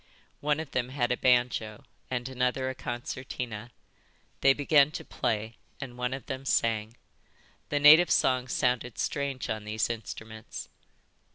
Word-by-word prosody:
One 150 Hz, +1 st, +1 dB
of 160 Hz, -3 st, -6 dB
them 125 Hz, -1 st, -1 dB
had 125 Hz, -2 st, 0 dB
a -, -, +3 dB
banjo 120 Hz, -4 st, +1 dB, 0.3 s
and 125 Hz, -1 st, -2 dB
another 130 Hz, 0 st, 0 dB
a -, -, -6 dB
concertina. 120 Hz, -2 st, -5 dB, 0.7 s
They 135 Hz, -, +6 dB
began 145 Hz, +1 st, +4 dB
to -, -, -6 dB
play, 110 Hz, 0 st, -2 dB, 0.2 s
and 130 Hz, -4 st, -7 dB
one 125 Hz, 0 st, -2 dB
of 135 Hz, -, -9 dB
them 130 Hz, 0 st, -5 dB
sang. 115 Hz, -3 st, 0 dB, 0.7 s
The 145 Hz, -, +1 dB
native 155 Hz, +4 st, +8 dB
song 130 Hz, -1 st, +2 dB
sounded 125 Hz, -1 st, 0 dB
strange 140 Hz, -3 st, -2 dB
on 110 Hz, -1 st, -3 dB
these 110 Hz, +2 st, -1 dB
instruments. 110 Hz, -1 st, -8 dB
125 Hz, 145 wpm, -29 LUFS, 115-135 Hz, 0.7 s, native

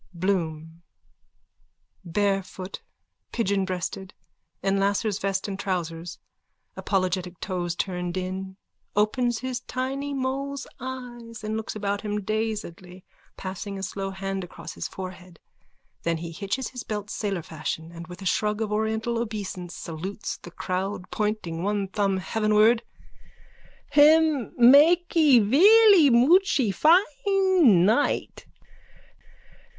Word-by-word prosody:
BLOOM: 165 Hz, -3 st, -2 dB, 1.2 s
_(Barefoot, 195 Hz, +1 st, -2 dB, 0.5 s
pigeonbreasted, 190 Hz, -3 st, -2 dB, 0.5 s
in 195 Hz, 0 st, +1 dB
lascar's 200 Hz, +1 st, 0 dB
vest 195 Hz, 0 st, -1 dB
and 195 Hz, -1 st, -5 dB
trousers, 170 Hz, -3 st, -3 dB, 0.6 s
apologetic 185 Hz, -2 st, -1 dB
toes 175 Hz, -3 st, -3 dB
turned 180 Hz, -1 st, -3 dB
in, 190 Hz, +1 st, -5 dB, 0.4 s
opens 230 Hz, +3 st, +1 dB
his 255 Hz, -1 st, -3 dB
tiny 270 Hz, +3 st, -4 dB
mole's 275 Hz, +1 st, -3 dB
eyes 240 Hz, -3 st, -8 dB
and 215 Hz, +1 st, -3 dB
looks 220 Hz, 0 st, -4 dB
about 200 Hz, -1 st, -2 dB
him 210 Hz, -1 st, -3 dB
dazedly, 210 Hz, -4 st, -4 dB, 0.3 s
passing 195 Hz, +1 st, -6 dB
a 190 Hz, -, -6 dB
slow 195 Hz, 0 st, -4 dB
hand 195 Hz, 0 st, -4 dB
across 170 Hz, -2 st, -9 dB
his -, -, -5 dB
forehead. 185 Hz, -2 st, -9 dB, 0.6 s
Then 170 Hz, -1 st, 0 dB
he 165 Hz, +1 st, -6 dB
hitches 200 Hz, +8 st, -3 dB
his 250 Hz, -1 st, -7 dB
belt 210 Hz, -2 st, -5 dB
sailor 195 Hz, -5 st, -3 dB
fashion 160 Hz, +1 st, -5 dB
and 170 Hz, -1 st, -9 dB
with 180 Hz, +2 st, -10 dB
a -, -, -8 dB
shrug 210 Hz, +3 st, 0 dB
of 220 Hz, -2 st, -2 dB
oriental 220 Hz, +2 st, -1 dB
obeisance 200 Hz, -6 st, -5 dB
salutes 180 Hz, +6 st, -5 dB
the -, -, -11 dB
court, 185 Hz, +2 st, -4 dB
pointing 210 Hz, -6 st, -2 dB
one 200 Hz, +1 st, -1 dB
thumb 195 Hz, -1 st, 0 dB
heavenward.)_ 215 Hz, +3 st, +3 dB, 1.1 s
Him 300 Hz, -3 st, +5 dB
makee 300 Hz, +3 st, +6 dB
velly 360 Hz, -, +7 dB
muchee 265 Hz, -, +4 dB
fine 335 Hz, -, +4 dB
night. 230 Hz, +8 st, 0 dB
205 Hz, 115 wpm, -25 LUFS, 185-245 Hz, 1.2 s, velly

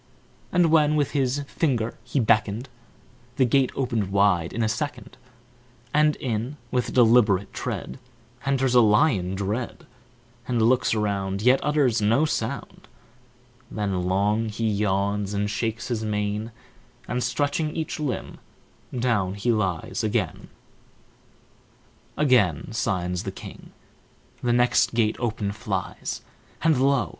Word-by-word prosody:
And 175 Hz, -3 st, +3 dB
when 155 Hz, -2 st, +4 dB
with 145 Hz, -2 st, +1 dB
his 135 Hz, 0 st, 0 dB
finger 125 Hz, -7 st, -1 dB
he 140 Hz, -, -1 dB
beckoned, 110 Hz, +1 st, +1 dB, 0.7 s
The 130 Hz, -, +3 dB
gate 130 Hz, +1 st, +2 dB
opened 115 Hz, -7 st, -1 dB
wide 100 Hz, -4 st, +2 dB
in 115 Hz, -, -1 dB
a -, -, +2 dB
second 115 Hz, 0 st, -4 dB, 0.8 s
And 150 Hz, 0 st, +4 dB
in, 125 Hz, +2 st, -3 dB
with 125 Hz, -1 st, 0 dB
deliberate 110 Hz, -5 st, +4 dB
tread, 65 Hz, -, -5 dB, 0.4 s
Enters 135 Hz, -2 st, +1 dB
a 125 Hz, -, +7 dB
lion 105 Hz, -, +3 dB
dread, 105 Hz, +5 st, -3 dB, 0.6 s
And 120 Hz, -2 st, 0 dB
looks 120 Hz, +1 st, +3 dB
around 100 Hz, -2 st, -1 dB
Yet 125 Hz, +3 st, +5 dB
utters 140 Hz, -7 st, +2 dB
no 115 Hz, +9 st, +3 dB
sound; 135 Hz, -2 st, -4 dB, 0.8 s
Then 95 Hz, -4 st, -2 dB
long 105 Hz, +4 st, +1 dB
he 115 Hz, +1 st, -2 dB
yawns 100 Hz, -1 st, 0 dB
And 105 Hz, 0 st, 0 dB
shakes 110 Hz, +2 st, -3 dB
his 115 Hz, -3 st, -2 dB
mane, 105 Hz, +1 st, -2 dB, 0.6 s
And, 125 Hz, 0 st, -1 dB
stretching 145 Hz, +5 st, -1 dB
each 160 Hz, -1 st, -3 dB
limb, 145 Hz, -6 st, -4 dB, 0.5 s
Down 110 Hz, -6 st, 0 dB
lies 105 Hz, -9 st, 0 dB
he 110 Hz, -, 0 dB
again. 105 Hz, -6 st, -2 dB, 1.7 s
Again 120 Hz, -, +2 dB
signs 90 Hz, -5 st, -1 dB
the -, -, -5 dB
king, -, -, -11 dB, 0.7 s
The 120 Hz, -, +1 dB
next 120 Hz, -1 st, +3 dB
gate 110 Hz, -2 st, +2 dB
open 110 Hz, -4 st, -2 dB
flies, 105 Hz, -, -4 dB, 0.4 s
And, 155 Hz, -5 st, +3 dB
lo! 135 Hz, -, +2 dB
115 Hz, 125 wpm, -25 LUFS, 105-130 Hz, 1.7 s, a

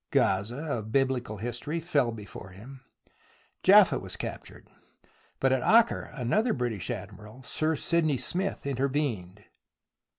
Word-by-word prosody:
Gazah, 120 Hz, +9 st, 0 dB
of 110 Hz, 0 st, -8 dB
Biblical 130 Hz, -4 st, 0 dB
history, 120 Hz, +9 st, -3 dB
fell 145 Hz, -7 st, +1 dB
before 105 Hz, -3 st, -9 dB
him, 120 Hz, +8 st, -12 dB, 0.8 s
Jaffa -, -, +6 dB
was -, -, -6 dB
captured, -, -, -8 dB, 0.7 s
but 135 Hz, -, +2 dB
at 130 Hz, -, +1 dB
Acre 230 Hz, -, +4 dB
another 210 Hz, -, +1 dB
British 115 Hz, -, -3 dB
Admiral, 110 Hz, +5 st, -8 dB
Sir 155 Hz, +5 st, -1 dB
Sydney 155 Hz, -2 st, +1 dB
Smith, 190 Hz, +6 st, -1 dB
intervened. 130 Hz, -8 st, -2 dB
130 Hz, 120 wpm, -28 LUFS, 110-150 Hz, 0.8 s, Jaffa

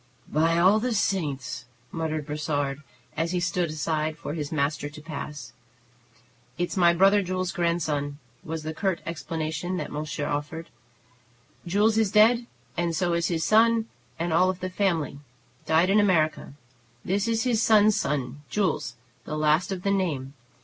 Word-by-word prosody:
"By 165 Hz, +2 st, +3 dB
all 190 Hz, +5 st, +5 dB
the 240 Hz, 0 st, -1 dB
saints!" 145 Hz, -, -1 dB, 0.3 s
muttered 155 Hz, -2 st, -2 dB
Brossard, 145 Hz, -2 st, -2 dB, 0.3 s
as 165 Hz, +3 st, -1 dB
he 180 Hz, -, +1 dB
stood 170 Hz, 0 st, 0 dB
aside 155 Hz, 0 st, -2 dB
for 145 Hz, -, -5 dB
his 150 Hz, -3 st, -4 dB
master 145 Hz, -1 st, -1 dB
to 145 Hz, +1 st, -11 dB
pass. 150 Hz, -5 st, -7 dB, 1.0 s
"It's 175 Hz, 0 st, -2 dB
my 175 Hz, -3 st, +5 dB
brother 195 Hz, +4 st, +5 dB
Jules's 185 Hz, -1 st, -2 dB
grandson," 155 Hz, -4 st, -1 dB, 0.3 s
was 160 Hz, 0 st, -5 dB
the 155 Hz, +1 st, -4 dB
curt 185 Hz, +1 st, -1 dB
explanation 165 Hz, +2 st, -3 dB
that -, -, -4 dB
monsieur 150 Hz, 0 st, -3 dB
offered. 150 Hz, +3 st, -4 dB, 1.0 s
"Jules 210 Hz, +5 st, +3 dB
is 220 Hz, -3 st, +2 dB
dead, 230 Hz, +3 st, +5 dB, 0.3 s
and 170 Hz, -1 st, -1 dB
so 175 Hz, +1 st, +1 dB
is 170 Hz, -1 st, +1 dB
his 165 Hz, -2 st, -1 dB
son 225 Hz, +4 st, +4 dB, 0.3 s
and 170 Hz, 0 st, -1 dB
all 185 Hz, +3 st, +4 dB
the 185 Hz, 0 st, -5 dB
family, 170 Hz, -8 st, 0 dB, 0.5 s
died 165 Hz, +4 st, +4 dB
in 210 Hz, -, +5 dB
America. 160 Hz, -9 st, +1 dB, 0.5 s
This 195 Hz, +3 st, 0 dB
is 225 Hz, -1 st, +1 dB
his 235 Hz, -3 st, +1 dB
son's 215 Hz, -2 st, +5 dB
son, 140 Hz, -1 st, -2 dB
Jules, 180 Hz, -11 st, -1 dB, 0.3 s
the 155 Hz, -, -4 dB
last 155 Hz, +5 st, +2 dB
of 185 Hz, -2 st, -4 dB
the 200 Hz, -, +1 dB
name. 150 Hz, -9 st, -1 dB
170 Hz, 155 wpm, -26 LUFS, 150-190 Hz, 1.0 s, all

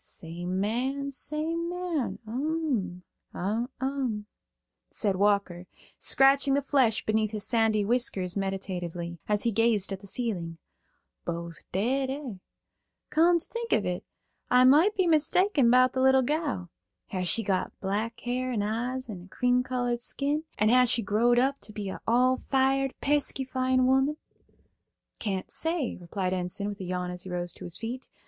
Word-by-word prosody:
"Same 175 Hz, +3 st, -5 dB
man, 260 Hz, +7 st, -1 dB
same 320 Hz, +4 st, -2 dB
man. 350 Hz, -6 st, -2 dB
Um, 245 Hz, -, -2 dB, 0.3 s
um," 240 Hz, +2 st, -2 dB, 0.7 s
saidWalker, 200 Hz, -3 st, +1 dB, 0.3 s
scratching 275 Hz, 0 st, +4 dB
the 285 Hz, -, +1 dB
flesh 255 Hz, -6 st, +2 dB
beneath 215 Hz, 0 st, +1 dB
his 210 Hz, -1 st, -4 dB
sandy 220 Hz, -3 st, +2 dB
whiskers 200 Hz, -6 st, +1 dB
meditatively, 180 Hz, -3 st, -4 dB
as 210 Hz, -1 st, +2 dB
he 235 Hz, -, +2 dB
gazed 220 Hz, -2 st, +2 dB
at 190 Hz, -, -5 dB
the 200 Hz, -, -10 dB
ceiling. 185 Hz, -8 st, -2 dB, 0.7 s
"Both 170 Hz, 0 st, -6 dB
dead, 260 Hz, +8 st, 0 dB
eh? 270 Hz, -3 st, -4 dB, 0.8 s
Come 340 Hz, +2 st, +5 dB
to 335 Hz, -, -3 dB
think 465 Hz, 0 st, -5 dB
of 210 Hz, -, +2 dB
it, 180 Hz, 0 st, -2 dB, 0.5 s
I 250 Hz, 0 st, +6 dB
moight 305 Hz, +11 st, +6 dB
be 375 Hz, -, +2 dB
mistaken 320 Hz, -, +3 dB
about 255 Hz, +1 st, +5 dB
the 260 Hz, -, 0 dB
little 265 Hz, 0 st, +5 dB
gal. 275 Hz, -, -2 dB, 0.4 s
Has 185 Hz, -2 st, -2 dB
she 225 Hz, -, +1 dB
got 195 Hz, -2 st, -2 dB
black 210 Hz, +4 st, -2 dB
hair 255 Hz, +1 st, -2 dB
and 215 Hz, -4 st, 0 dB
eyes 245 Hz, +5 st, -2 dB
and 185 Hz, -6 st, -8 dB
a -, -, -18 dB
cream 250 Hz, +4 st, +2 dB
colored 245 Hz, -1 st, -2 dB
skin, 290 Hz, +5 st, -1 dB
and 215 Hz, +1 st, +3 dB
has 250 Hz, 0 st, +5 dB
she 235 Hz, -1 st, +1 dB
growed 230 Hz, +5 st, +3 dB
up 270 Hz, +3 st, +2 dB
to -, -, -8 dB
be 205 Hz, -2 st, -5 dB
a -, -, -7 dB
all 250 Hz, +3 st, +4 dB
fired 270 Hz, 0 st, +1 dB
pesky 285 Hz, -1 st, +1 dB
fine 255 Hz, 0 st, +1 dB
woman?" 265 Hz, +3 st, +2 dB, 1.0 s
"Can't 195 Hz, -4 st, -3 dB
say," 325 Hz, -5 st, -1 dB
replied 185 Hz, +1 st, -3 dB
Enson, 185 Hz, +2 st, -3 dB
with 205 Hz, -, -7 dB
a 190 Hz, -, -5 dB
yawn 180 Hz, 0 st, -3 dB
as 180 Hz, 0 st, -5 dB
he 185 Hz, -, -8 dB
rose 175 Hz, -1 st, -1 dB
to -, -, -10 dB
his 175 Hz, 0 st, -3 dB
feet. 245 Hz, +3 st, -6 dB
235 Hz, 160 wpm, -28 LUFS, 195-270 Hz, 1.0 s, I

